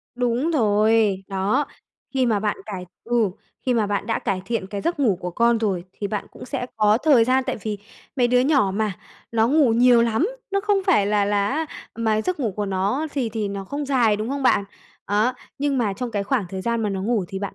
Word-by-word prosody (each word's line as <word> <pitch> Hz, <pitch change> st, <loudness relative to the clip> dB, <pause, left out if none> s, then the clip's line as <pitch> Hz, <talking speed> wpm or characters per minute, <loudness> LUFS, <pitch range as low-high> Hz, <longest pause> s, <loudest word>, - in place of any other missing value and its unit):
Đúng 245 Hz, +5 st, 0 dB
rồi! 215 Hz, -, +2 dB
Đó. 200 Hz, +9 st, 0 dB, 0.5 s
Khi 260 Hz, -2 st, +2 dB
mà 215 Hz, -3 st, +1 dB
bạn 210 Hz, 0 st, 0 dB
cải 190 Hz, -4 st, -5 dB, 0.2 s
ừ, 230 Hz, -4 st, +1 dB, 0.4 s
khi 250 Hz, -, +2 dB
mà 220 Hz, -3 st, +2 dB
bạn 205 Hz, +2 st, -2 dB
đã 225 Hz, -, 0 dB
cải 190 Hz, -3 st, -2 dB
thiện 230 Hz, -5 st, -2 dB
cái 200 Hz, 0 st, -5 dB
giấc 335 Hz, -, -1 dB
ngủ 215 Hz, -9 st, +3 dB
của 180 Hz, -, -4 dB
con 235 Hz, +4 st, +2 dB
rồi 190 Hz, -5 st, -1 dB
thì 205 Hz, -, -4 dB
bạn 210 Hz, -1 st, -3 dB
cũng -, -, -11 dB
sẽ 250 Hz, -2 st, -4 dB
có 215 Hz, +1 st, +4 dB
thời 275 Hz, -8 st, +5 dB
gian. 260 Hz, +1 st, +2 dB
Tại -, -, -1 dB
vì 210 Hz, -2 st, -3 dB, 0.4 s
mấy 245 Hz, -2 st, +3 dB
đứa 250 Hz, 0 st, +4 dB
nhỏ 265 Hz, -7 st, +3 dB
mà, 215 Hz, -1 st, 0 dB, 0.4 s
nó 225 Hz, 0 st, +3 dB
ngủ 280 Hz, -5 st, +4 dB
nhiều 240 Hz, 0 st, +5 dB
lắm, 235 Hz, -, +1 dB, 0.2 s
nó 395 Hz, 0 st, +1 dB
không 410 Hz, -1 st, +2 dB
phải 210 Hz, -, +4 dB
là 205 Hz, -1 st, +2 dB
là 205 Hz, 0 st, +1 dB
á 315 Hz, +3 st, -1 dB, 0.3 s
mà 220 Hz, -1 st, +1 dB
giấc 365 Hz, +1 st, -2 dB
ngủ 225 Hz, -7 st, -1 dB
của 205 Hz, -1 st, -1 dB
nó 200 Hz, +11 st, 0 dB
thì 260 Hz, -5 st, -1 dB
thì 215 Hz, -2 st, -3 dB
nó 200 Hz, -1 st, -5 dB
không 285 Hz, +8 st, -4 dB
dài, 240 Hz, -6 st, +3 dB
đúng 215 Hz, +2 st, -3 dB
không 275 Hz, +1 st, -3 dB
bạn? 200 Hz, -5 st, +3 dB, 0.5 s
Đó, 215 Hz, +5 st, +3 dB, 0.3 s
nhưng 280 Hz, -1 st, 0 dB
mà 215 Hz, -5 st, +1 dB
trong 245 Hz, +4 st, -4 dB
cái 205 Hz, -3 st, -1 dB
khoảng 225 Hz, -1 st, 0 dB
thời 190 Hz, 0 st, -5 dB
gian 235 Hz, -1 st, 0 dB
mà 210 Hz, -, 0 dB
nó 190 Hz, -1 st, -3 dB
ngủ 220 Hz, -2 st, 0 dB
thì 195 Hz, -1 st, -5 dB
bạn 200 Hz, 0 st, -5 dB
225 Hz, 235 wpm, -23 LUFS, 205-255 Hz, 0.5 s, thời